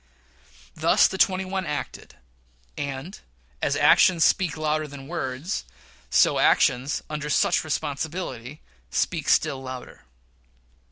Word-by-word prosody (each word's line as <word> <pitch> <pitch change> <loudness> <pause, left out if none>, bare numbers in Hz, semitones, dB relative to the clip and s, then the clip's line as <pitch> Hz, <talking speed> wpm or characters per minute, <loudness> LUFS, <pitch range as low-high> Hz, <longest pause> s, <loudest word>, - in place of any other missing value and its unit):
Thus - - +4
the 190 - -6
twenty 190 0 +2
one 190 0 -3
acted; 150 -1 -6 0.6
and, 140 +6 -6 0.4
as 140 - +1
actions 160 +3 +5
speak 175 -5 +1
louder 155 0 -1
than 140 -1 -10
words, 155 +1 -4 0.5
so - - +3
actions 130 +3 +2
under 150 -1 -5
such - - +2
responsibilities 145 -3 -4 0.3
speak - - -1
still 135 - +2
louder. 130 - -9
150 Hz, 110 wpm, -24 LUFS, 135-170 Hz, 0.6 s, actions